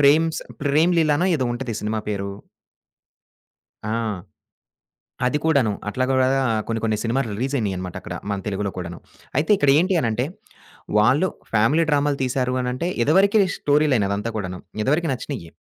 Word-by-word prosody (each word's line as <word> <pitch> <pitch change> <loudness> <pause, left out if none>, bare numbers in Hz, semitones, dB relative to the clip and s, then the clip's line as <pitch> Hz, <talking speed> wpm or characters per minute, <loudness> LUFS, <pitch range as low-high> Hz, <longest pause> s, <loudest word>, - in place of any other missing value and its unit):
ప్రేమ్స్ 155 +3 +4 0.2
'ప్రేమ్‌లీలనో' 160 +3 +3
ఏదో 130 - -1
ఉంటది 120 -2 -4
సినిమా 110 +1 -2
పేరు. 100 -1 -2 1.6
ఆ! - - -2 1.4
అది 150 +4 +1
కూడాను. 140 -9 +3 0.2
అట్లాగ 130 +5 -1
కూడా 130 0 +3 0.4
కొన్ని 115 -1 -1
కొన్ని 110 -1 +1
సినిమాలు 120 +1 0
రిలీజ్ 135 +4 -2
అయినాయన్నమాటక్కడ 95 -4 -4 0.2
మన 100 - -1
తెలుగులో 100 0 -2
కూడాను. 85 -1 -6 0.4
అయితే 155 - 0
ఇక్కడ 145 -6 +3
ఏంటి 185 +3 +2
అనంటే 120 -1 0 0.8
వాళ్ళు, 135 +12 +3 0.2
ఫ్యామిలీ 115 +10 +3
డ్రామలు 145 -1 +2
తీసారు 125 0 0
అనంటే, 125 +8 -2
ఇదివరకే 195 - +4 0.2
స్టోరీ 150 +1 +2
లైన్ 105 -5 +2
అదంతా 105 +3 -2
కూడాను. 90 -3 -4 0.2
ఇదివరికి 155 +5 +1
నచ్చినయి. 120 - -6
130 Hz, 135 wpm, -22 LUFS, 110-150 Hz, 1.6 s, ప్రేమ్స్